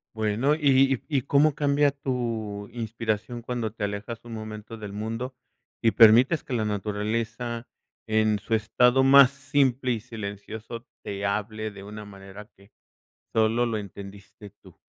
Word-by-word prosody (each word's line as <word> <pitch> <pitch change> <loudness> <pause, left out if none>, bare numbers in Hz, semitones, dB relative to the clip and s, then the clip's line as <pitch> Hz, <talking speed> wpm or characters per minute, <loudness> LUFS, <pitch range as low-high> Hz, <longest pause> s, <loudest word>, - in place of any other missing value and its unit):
Bueno, 110 +7 +1
¿y 135 -3 +4
y 145 -3 0
y - - +2
cómo 145 +3 +3
cambia 145 0 +2
tu 115 -7 -3
inspiración 115 0 -3
cuando 120 -3 -3
te 110 - -6
alejas 105 +3 -4
un 115 - -8
momento 110 0 -7
del 105 -2 -7
mundo 115 +5 -4 0.5
y 115 - +5
permites 120 +9 +6
que 130 - -6
la 110 -3 0
naturaleza 110 +3 -3 0.4
en 110 -1 +2
su 110 - -1
estado 125 +4 +3
más 135 0 +8
simple 135 -2 0
y 115 - -1
silencioso 110 +1 -8 0.2
te 100 0 -4
hable 110 +2 -2
de 100 -1 -11
una 105 +1 -9
manera 100 +1 -11
que 100 +1 -21 0.6
solo 115 +2 +2
lo 115 -2 -1
entendiste 100 0 -10
tú? 95 -3 -19
110 Hz, 150 wpm, -26 LUFS, 105-125 Hz, 0.6 s, más